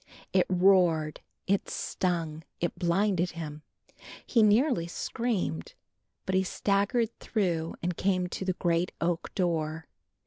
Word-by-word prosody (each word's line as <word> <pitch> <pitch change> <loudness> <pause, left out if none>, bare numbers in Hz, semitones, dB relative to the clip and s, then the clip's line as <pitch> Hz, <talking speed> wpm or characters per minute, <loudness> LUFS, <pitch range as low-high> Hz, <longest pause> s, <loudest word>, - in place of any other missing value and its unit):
It 185 -1 +4
roared, 180 -4 +3 0.3
it 200 +1 0
stung, 165 -4 -2 0.2
it 175 - -1
blinded 180 0 +1
him, 155 -3 -6 0.6
he 235 - +3
nearly 215 - +4
screamed, 185 - -2 0.5
but 190 - -2
he 190 - +4
staggered 205 +5 +1
through 170 -7 -1
and 180 0 -1
came 185 -1 +1
to 190 - -4
the 185 -1 0
great 175 0 0
oak 170 0 -1
door. 160 -4 -1
180 Hz, 125 wpm, -29 LUFS, 165-200 Hz, 0.6 s, It